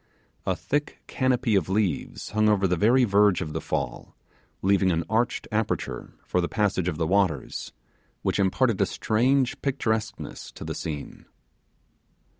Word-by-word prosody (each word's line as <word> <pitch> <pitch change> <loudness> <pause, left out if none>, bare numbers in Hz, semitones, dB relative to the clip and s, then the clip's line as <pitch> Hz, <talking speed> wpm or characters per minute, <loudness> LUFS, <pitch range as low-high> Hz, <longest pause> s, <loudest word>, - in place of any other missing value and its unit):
A - - +2
thick 145 +1 -3
canopy 130 -3 +1
of 95 -6 +2
trees 95 -1 -1
hung 110 0 +3
over 100 -2 +3
the 90 - +1
very 120 +8 +4
verge 100 -3 +4
of 75 - -4
the - - -2
fall, 60 - -4 0.5
leaving 95 0 +3
an 85 0 0
arched 115 +3 0
aperture 110 0 -2
for 90 - +1
the 85 - -2
passage 100 -5 0
of 80 -4 -1
the 80 - 0
waters, 90 -6 0 0.5
which - - 0
imparted 100 +3 +2
a - - +3
strange 125 +4 +1
picturesqueness 110 -6 -2
to - - -8
the - - -3
scene. 75 -3 -6
105 Hz, 150 wpm, -26 LUFS, 90-115 Hz, 0.5 s, very